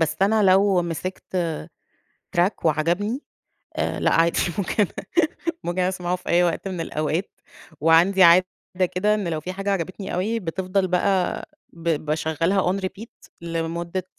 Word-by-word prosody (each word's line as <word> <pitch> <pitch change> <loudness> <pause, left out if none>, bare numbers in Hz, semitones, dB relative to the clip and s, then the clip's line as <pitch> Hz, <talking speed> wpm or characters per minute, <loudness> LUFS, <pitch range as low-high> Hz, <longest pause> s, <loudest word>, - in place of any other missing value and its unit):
بس 160 -2 +1
أنا 215 +2 +3
لو 190 -1 +4
مسِكت 170 +2 -5
آآ 165 -4 -2 0.7
track 180 +2 +1
وعجبني، 175 - 0 0.5
آآ - - -1
لأ - - +2
عادي، 165 +1 +3 0.2
ممكن 200 +1 +1 0.8
ممكن 175 +2 -1
أسمَعه 180 -1 -1
في 180 - -11
أي 175 +1 +4
وقت 175 +3 -1
من 180 -3 -4
الأوقات 160 +4 -2 0.5
وعندي 170 +5 +5
عادة 180 +1 +7 0.5
كده 205 +4 +2
إن 205 -5 -2
لو 160 -2 -2
في 180 +4 -5
حاجة 195 +2 -3
عجبتني 190 +1 -3
أوي 215 +6 -1
بتفضَل 185 +2 -1
بقى 185 +1 +1 0.3
ب 170 0 -6 0.2
باشغّلها 165 +5 +1
on 195 - -2
repeat 200 +5 -6 0.3
لمدّة 170 +2 -3
180 Hz, 145 wpm, -23 LUFS, 170-195 Hz, 0.8 s, عادة